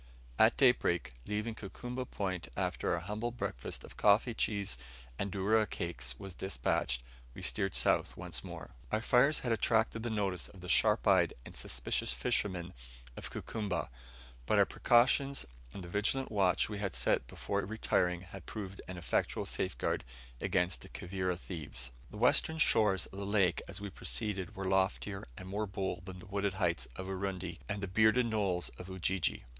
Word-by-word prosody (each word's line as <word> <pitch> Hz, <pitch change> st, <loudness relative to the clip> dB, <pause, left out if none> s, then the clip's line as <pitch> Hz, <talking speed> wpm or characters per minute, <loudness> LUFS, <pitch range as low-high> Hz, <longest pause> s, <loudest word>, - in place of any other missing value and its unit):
At 110 Hz, +1 st, +6 dB
daybreak, 85 Hz, -, +3 dB
leaving 105 Hz, +2 st, -1 dB
Kukumba 120 Hz, +5 st, -6 dB
Point 95 Hz, -4 st, -2 dB
after -, -, 0 dB
our 85 Hz, -, -3 dB
humble 105 Hz, +6 st, -2 dB
breakfast 115 Hz, -, -4 dB
of -, -, -12 dB
coffee, 105 Hz, +4 st, +5 dB
cheese, 100 Hz, -, 0 dB, 0.4 s
and 100 Hz, -1 st, -1 dB
dourra 105 Hz, +3 st, +3 dB
cakes 70 Hz, -9 st, -4 dB
was 95 Hz, -2 st, -7 dB
despatched, 85 Hz, -9 st, -1 dB, 0.3 s
we -, -, -8 dB
steered 95 Hz, -2 st, -1 dB
south -, -, +2 dB
once -, -, -3 dB
more. -, -, -8 dB, 0.2 s
Our 110 Hz, -, +1 dB
fires 140 Hz, +6 st, +4 dB
had 120 Hz, -, -1 dB
attracted 115 Hz, +1 st, +2 dB
the 120 Hz, -, -2 dB
notice 100 Hz, -4 st, -1 dB
of 95 Hz, -, -14 dB
the 90 Hz, -, -7 dB
sharp 110 Hz, +3 st, +4 dB
eyed 95 Hz, -4 st, +5 dB
and -, -, -9 dB
suspicious -, -, -1 dB
fishermen 90 Hz, +8 st, 0 dB, 0.4 s
of -, -, -6 dB
Kukumba; 100 Hz, -, -3 dB, 0.6 s
but -, -, +3 dB
our -, -, +7 dB
precautions 135 Hz, +3 st, +3 dB, 0.3 s
and 95 Hz, -, -7 dB
the -, -, -7 dB
vigilant 105 Hz, +9 st, 0 dB
watch 95 Hz, -4 st, +3 dB
we 105 Hz, -2 st, -5 dB
had 100 Hz, -3 st, -2 dB
set -, -, +2 dB
before 100 Hz, +9 st, -2 dB
retiring, 90 Hz, -4 st, +1 dB
had 90 Hz, -1 st, -11 dB
proved 100 Hz, -3 st, -6 dB
an 95 Hz, -, -6 dB
effectual 85 Hz, -, 0 dB
safeguard -, -, -1 dB, 0.4 s
against 90 Hz, -2 st, +1 dB
the -, -, -11 dB
Kivira 90 Hz, 0 st, -2 dB
thieves. 75 Hz, -9 st, -5 dB, 0.2 s
The -, -, -9 dB
western 160 Hz, -, +4 dB
shores 105 Hz, -, +4 dB
of 95 Hz, -, -9 dB
the -, -, -3 dB
lake 100 Hz, -4 st, +3 dB
as 100 Hz, 0 st, -7 dB
we 100 Hz, -1 st, -5 dB
proceeded 105 Hz, -1 st, -3 dB
were 95 Hz, -1 st, -4 dB
loftier, 95 Hz, +1 st, +1 dB
and 90 Hz, -, -8 dB
more 105 Hz, +3 st, -2 dB
bold 95 Hz, -2 st, -3 dB
than 95 Hz, -1 st, -6 dB
the 90 Hz, -, -11 dB
wooded 100 Hz, -1 st, -1 dB
heights 85 Hz, -3 st, 0 dB
of 95 Hz, -, -5 dB
Urundi 95 Hz, -3 st, -3 dB
and 100 Hz, -3 st, -3 dB
bearded 110 Hz, +4 st, +5 dB
knolls 100 Hz, -6 st, 0 dB
of 90 Hz, -, -8 dB
Ujiji. 95 Hz, -7 st, 0 dB
95 Hz, 170 wpm, -33 LUFS, 90-110 Hz, 0.6 s, our